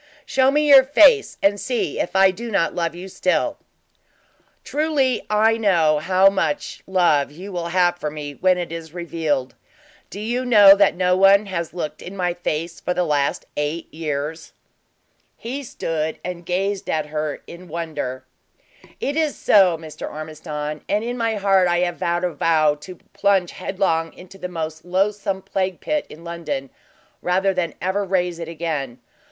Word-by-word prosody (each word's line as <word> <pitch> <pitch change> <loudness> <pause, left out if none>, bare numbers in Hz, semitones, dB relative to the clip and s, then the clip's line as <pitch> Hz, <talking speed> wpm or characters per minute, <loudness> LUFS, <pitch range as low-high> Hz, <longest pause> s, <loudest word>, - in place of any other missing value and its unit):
Show 265 0 +3
me 300 +2 +2
your 275 -2 +9
face 415 - +5
and 200 +1 +3
see 245 +2 -2
if - - -2
I 190 0 +6
do 235 +5 -7
not 195 -6 +1
love 170 -1 -2
you 180 +2 -8
still!" 190 +10 0 1.0
"Truly 285 -5 0
I 220 +2 +3
know 165 -8 +3
how 185 +4 +4
much 200 +9 -1
love 175 -7 +2
you 180 +7 -10
will 175 -2 -3
have 175 0 +2
for 150 - -2
me 145 -1 -7
when 185 +4 +2
it 175 -2 -4
is 165 0 -8
revealed. 160 -6 -2 0.6
Do 200 - -8
you 240 +4 -2
know 205 -5 +8
that 200 0 +3
no 180 0 +2
one 195 +2 +5
has 170 -4 -4
looked 160 -4 -5
in 190 +3 -9
my 180 -1 0
face 170 -1 -4
for 180 - -2
the 180 - +1
last 145 -4 0
eight 150 +3 -3
years." 155 0 -4 0.8
He 255 +5 -5
stood 160 - -3
and 175 -1 -6
gazed 195 +2 -1
at 155 -1 0
her 150 -1 -4
in 180 +1 -11
wonder. 155 -6 -5 0.7
"It 285 - -2
is 315 -2 0
so, 190 -5 +4
Mr. 160 -1 -8
Ormiston; 155 -1 -6
and 210 +2 +1
in 240 +1 -3
my 230 -2 -1
heart 195 -2 +3
I 175 0 +1
have 175 -1 -1
vowed 175 +1 -1
a 180 -2 -1
vow 155 -1 +3
to 150 +5 -11 0.2
plunge 195 -3 +2
headlong 180 -4 -1
into 185 +2 -14
the 180 - -4
most 160 -2 -5
loathsome 195 +1 -1
plague 190 -2 -2
pit 300 -1 -2
in 160 - -12
London, 150 -6 -5 0.5
rather 190 +2 +1
than 175 -4 -2
ever 190 +2 0
raise 180 -3 -1
it 165 - -5
again. 155 -7 -4
180 Hz, 170 wpm, -21 LUFS, 160-200 Hz, 1.0 s, your